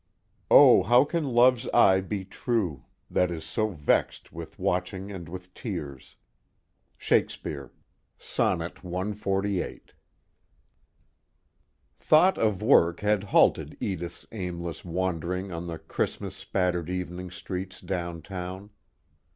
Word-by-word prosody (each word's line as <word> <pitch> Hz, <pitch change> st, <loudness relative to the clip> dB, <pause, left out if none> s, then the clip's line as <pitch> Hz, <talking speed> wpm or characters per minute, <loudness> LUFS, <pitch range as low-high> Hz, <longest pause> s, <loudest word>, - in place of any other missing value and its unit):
O -, -, +8 dB
how 120 Hz, +5 st, +5 dB
can 165 Hz, +1 st, -1 dB
Love's 125 Hz, -1 st, +4 dB
eye 95 Hz, -1 st, +6 dB
be 95 Hz, 0 st, -4 dB
true, 95 Hz, -, -2 dB, 0.3 s
That 90 Hz, -, +2 dB
is 80 Hz, -2 st, -5 dB
so 110 Hz, +6 st, -1 dB
vex'd 75 Hz, -8 st, 0 dB
with -, -, -9 dB
watching 95 Hz, +2 st, -2 dB
and 85 Hz, -5 st, -8 dB
with 90 Hz, +1 st, -9 dB
tears? 75 Hz, -, -7 dB, 0.8 s
SHAKESPEARE, 70 Hz, -2 st, -1 dB, 0.5 s
Sonnet 85 Hz, -1 st, -1 dB
CXLVIII 95 Hz, +1 st, -2 dB
I -, -, -8 dB, 2.2 s
Thought 175 Hz, +5 st, +4 dB
of 105 Hz, -3 st, +1 dB
work 85 Hz, -9 st, +4 dB
had 105 Hz, -1 st, +1 dB
halted 100 Hz, -, +3 dB
Edith's 85 Hz, -3 st, -4 dB
aimless 85 Hz, -5 st, -5 dB
wandering 90 Hz, +1 st, -2 dB
on 85 Hz, 0 st, -5 dB
the 85 Hz, -1 st, -5 dB
Christmas -, -, -3 dB
spattered 90 Hz, -3 st, -1 dB
evening 90 Hz, 0 st, -4 dB
streets 95 Hz, 0 st, -6 dB
downtown. 90 Hz, +2 st, -5 dB
90 Hz, 110 wpm, -27 LUFS, 85-100 Hz, 2.2 s, O